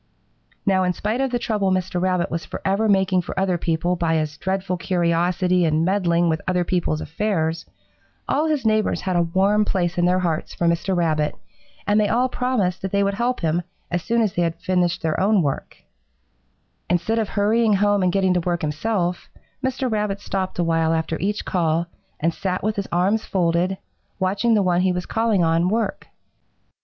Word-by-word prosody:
Now, 190 -1 +3
in 180 0 +1
spite 215 +7 -2
of 270 - +1
the 245 - 0
trouble 210 -4 0
Mr. 185 -1 -1
Rabbit 185 -1 0
was 165 0 -2
forever 200 +3 -1
making 190 -2 +3
for 180 +2 -5
other 185 -2 +1
people 170 +2 0
by 170 -2 0
his 155 -2 -1
dreadful 190 +3 -2
curiosity 180 +1 +1
and 160 0 +2
meddling 175 -3 +2
with 160 -1 0
other 180 -1 +1
people's 170 -3 -1
affairs, 165 -3 -2 0.6
all 300 +3 +1
his 300 -5 -1
neighbors 215 -1 +1
had 185 -2 -2
a 175 - +4
warm 190 +5 +2
place 175 -3 -1
in 175 - +3
their 180 +1 +3
hearts 170 -4 -2
for 175 - -1
Mr. 170 +3 +1
Rabbit, 155 -3 0 0.5
and 205 +1 +3
they 210 - +3
all 250 +4 +1
promised 215 -9 -1
that 190 - -4
they 200 0 +2
would 200 0 0
help 240 +4 -1
him 165 +1 +1 0.3
as 175 0 0
soon 230 +5 +1
as 210 - -1
they 175 - 0
had 165 -1 0 0.5
their 160 -2 -1
own 200 -1 +3
work 140 -2 -3
finished. - - -30 1.0
"Instead 180 +6 +1
of 220 - -1
hurrying 215 +2 +2
home 205 0 +2
and 180 -1 +2
getting 190 -1 +2
to 180 - +2
work 175 -1 -2
himself, 175 +3 -2 0.3
Mr. 260 0 -1
Rabbit 210 -3 -1
stopped 190 -2 -3
a 175 - +1
while 165 -1 +1
after 160 0 -1
each 205 +3 -2
call 170 -2 0 0.3
and 165 +2 +1
sat 185 0 -3
with 215 +1 0
his 200 -1 -3
arms 195 +6 +1
folded, 180 +1 0 0.4
watching 200 +5 +1
the 205 - +3
one 180 -1 +2
he 185 0 +2
was 180 0 -3
calling 225 -5 +1
on 165 +2 +2
work. 225 +2 -2
185 Hz, 190 wpm, -22 LUFS, 170-205 Hz, 1.0 s, a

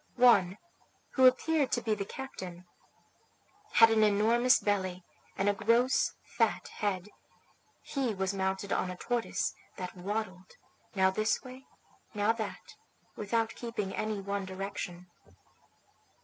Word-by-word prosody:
One, 200 -7 +5 0.5
who 260 -1 +6
appeared 285 +2 +2
to 240 - +1
be 220 - +1
the 200 -2 -3
captain, 185 -11 -8 1.1
had 225 -1 +7
an 220 -1 +3
enormous 225 +4 +4
belly 185 -3 -1 0.3
and 195 - +1
a 205 - +4
gross 235 +5 +2
fat - - 0
head; 205 -2 -2 0.7
he 260 -6 -2
was 190 0 -1
mounted 190 +1 -1
on 185 - 0
a 180 - -6
tortoise, 240 +2 -1 0.2
that 180 0 -6
waddled, 185 -1 -4 0.4
now 190 -1 +4
this 215 +3 0
way, 260 0 -11 0.5
now 205 +1 +3
that, 220 -3 -6 0.4
without 225 +2 -1
keeping 230 -5 -4
any 215 -1 -2
one 200 0 -3
direction. 185 -2 -5
205 Hz, 125 wpm, -31 LUFS, 190-230 Hz, 1.1 s, had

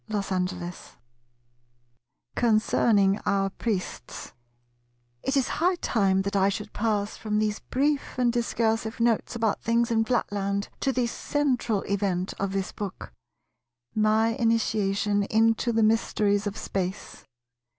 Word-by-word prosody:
§ 195 -3 -1
11 175 -1 -6 1.6
Concerning 215 -3 +3
our 195 -1 +1
Priests 190 - -4 0.9
It 270 - 0
is 265 - +2
high 360 +2 +3
time 195 - +1
that 200 +1 -3
I 195 0 +4
should 210 +1 -5
pass 210 -2 -1
from 210 -1 -2
these 215 0 0
brief 285 +1 -1
and 245 -2 +2
discursive 225 -2 0
notes 230 0 +1
about 225 -3 0
things 235 +1 +1
in 225 -1 +3
Flatland 200 -4 -1
to 270 - +1
the 250 -2 0
central 245 -4 -1
event 190 -2 -1
of 195 -1 -1
this 195 -1 -2
book, 195 - -7 0.8
my 215 +1 +3
initiation 210 -3 +1
into 225 +2 +2
the 225 -1 +2
mysteries 210 -2 +2
of 205 - -4
Space. 190 +1 -4
215 Hz, 125 wpm, -26 LUFS, 200-230 Hz, 1.6 s, I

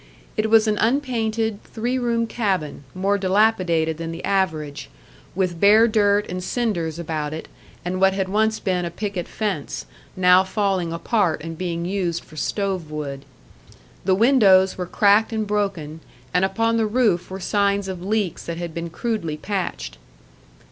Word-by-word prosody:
It 215 0 0
was 220 0 +5
an 210 -1 +1
unpainted, 225 -4 0
three 245 +3 -2
room 235 -1 0
cabin, 190 - -2
more 200 +2 +1
dilapidated 185 -5 +2
than 165 0 -4
the 165 +1 -6
average, 160 -7 -1 0.5
with 180 -3 -1
bare 215 +4 +6
dirt 205 -2 +3
and 180 0 -5
cinders 180 -8 -1
about 155 -3 -3
it, 160 - -7 0.4
and 185 +1 -2
what 190 0 +5
had 190 -1 -1
once 220 +3 +1
been 180 -2 -1
a 170 - -2
picket 195 -1 -4
fence, 195 -10 -3 0.3
now 180 0 +6
falling 190 -3 -1
apart 170 -1 0
and 165 0 -6
being 170 0 -3
used 180 -3 -2
for 155 - -16
stove 190 0 -2
wood. 140 -3 -5 0.8
The 190 0 +3
windows 200 -5 +5
were 180 -1 -4
cracked 205 +4 +3
and 220 -1 -1
broken, 195 -7 -2 0.3
and 180 +2 +3
upon 225 +4 +1
the 220 -1 +2
roof 210 -6 +1
were 190 +1 -6
signs 200 0 +1
of 185 -2 -5
leaks 205 -3 -1
that 170 -1 -4
had 170 -1 -5
been 170 +1 -4
crudely 175 -5 -3
patched. 185 - -4
190 Hz, 160 wpm, -22 LUFS, 170-215 Hz, 0.8 s, bare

